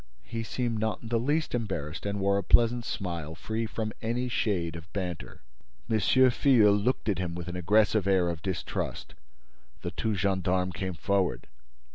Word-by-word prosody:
He 115 - -4
seemed 115 0 -2
not 110 -2 -2
in 115 - -7
the 115 -1 +2
least 150 +6 0
embarrassed 95 -8 -3
and 100 0 -2
wore 100 0 +2
a - - -3
pleasant 120 +4 +4
smile, 85 -7 -4
free 110 +8 -3
from 110 0 -3
any 120 +2 -1
shade 90 -8 0
of 85 +1 -10
banter. 90 -5 -5 0.5
M. 110 - +3
Filleul 125 -1 +5
looked 115 +5 0
at 100 -4 +1
him 85 -2 -2
with 85 0 -6
an 90 - -5
aggressive 105 +3 +3
air 95 -3 +3
of 85 -2 -3
distrust. 95 -3 -4 0.7
The - - -3
two 110 -2 -1
gendarmes 95 -1 0
came 95 +1 -3
forward. 95 +3 0
100 Hz, 170 wpm, -28 LUFS, 90-115 Hz, 0.7 s, Filleul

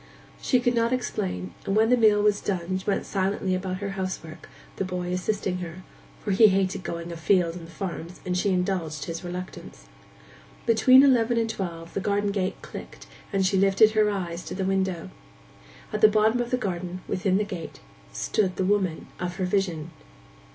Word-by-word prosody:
She 255 - +3
could 245 0 +1
not 230 0 +2
explain, 90 - -2
and 195 - -1
when 220 +2 +4
the - - +7
meal 215 -3 +4
was 210 -1 +3
done 185 -1 -2
went 200 - 0
silently 195 -1 -1
about 185 0 -2
her 200 - -2
household 185 -4 -4
work, - - -13 0.3
the - - 0
boy 180 -1 -3
assisting 185 0 -1
her, 175 +1 -7 0.4
for 205 - -1
he 215 +3 +7
hated 195 -1 +1
going 170 -1 -5
afield 170 0 +2
on 170 -2 -8
the - - -13
farms, 170 0 -6
and 180 -1 -1
she 180 +3 +1
indulged 180 -5 -1
his 165 +1 -5
reluctance. 180 +1 -7 0.8
Between 255 +3 +7
eleven 240 -4 +4
and 230 -1 +2
twelve 170 -5 -5
the - - -1
garden 205 +1 0
gate 195 -1 -1
clicked, - - -9 0.3
and 195 -2 +1
she 190 +1 +2
lifted 195 +3 +5
her 215 -1 +3
eyes 180 -4 -3
to - - -5
the 190 0 -2
window. 190 -2 -1 0.8
At 215 - -2
the - - +9
bottom 215 +3 +3
of 240 - -3
the 250 - +1
garden, 185 -4 -4
within 190 0 +1
the 210 - +1
gate, 180 -6 -7 0.3
stood 185 - 0
the 190 - 0
woman 190 -4 0
of 180 0 -3
her 185 - -1
vision. 180 -4 -1
190 Hz, 185 wpm, -26 LUFS, 180-205 Hz, 0.8 s, the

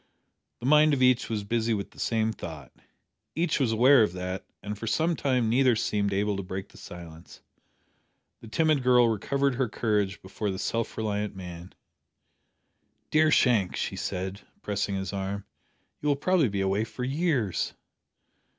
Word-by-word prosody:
The - - -5
mind 150 +1 +5
of 130 - +1
each 125 -1 +3
was 110 -3 -2
busy 115 +1 0
with 100 -1 -5
the - - -16
same 110 -1 0
thought. - - -8 0.6
Each 170 0 +1
was 130 -5 +2
aware 125 +4 +6
of 105 -5 +2
that, 90 +1 -5 0.2
and 105 +1 -4
for 115 +3 -7
some 160 +9 +1
time 130 -5 +1
neither 125 +1 +4
seemed 105 -2 0
able 100 +1 0
to - - -2
break 95 +1 -6
the - - -17
silence. 85 -2 -11 1.0
The 115 - -12
timid 155 +5 +2
girl 125 -2 +5
recovered 140 +6 0
her 125 -1 -1
courage 105 -3 0
before 100 +2 -4
the 95 - -3
self 115 +4 -2
reliant 105 -2 -2
man! 90 -1 -9 1.4
"Dear 155 0 +4
Shank," 115 -10 +3
she - - -3
said, 95 +2 -4 0.2
pressing 105 -1 -1
his 95 -1 -4
arm, 100 +1 -3 0.6
"you 150 - 0
will 145 - +3
probably 165 -2 +2
be 100 -1 -2
away 95 +2 +1
for 125 +2 -6
years." 135 - 0
110 Hz, 165 wpm, -27 LUFS, 100-130 Hz, 1.4 s, aware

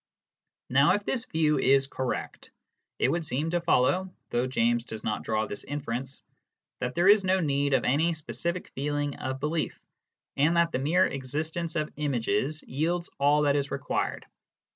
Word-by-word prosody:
Now 140 +3 +5
if 205 0 -4
this 255 -2 -1
view 155 - +1
is 135 0 +4
correct, 130 -1 -4 0.5
it - - +2
would 170 0 0
seem 150 +3 -2
to 175 0 +1
follow 175 +4 +2 0.2
(though 120 +2 +1
James 120 -2 +1
does 110 -2 -8
not 105 - -1
draw 110 0 0
this 105 - -6
inference) 135 -2 -5 0.6
that 125 0 -3
there 175 +2 +3
is 205 0 +7
no 190 0 +2
need 140 -3 +1
of 125 - +1
any 160 +6 +2
specific 170 +3 -4
feeling 145 +1 -2
of 130 0 -4
belief, 155 +3 -2 0.6
and 155 +5 +3
that 170 0 +3
the - - -1
mere 165 +7 +3
existence 155 +5 -3
of 155 -2 -2
images 140 0 -1
yields 170 +6 -2
all 145 +2 +4
that 145 -1 +3
is 140 -1 0
required. 140 - -2
145 Hz, 165 wpm, -28 LUFS, 130-165 Hz, 0.6 s, is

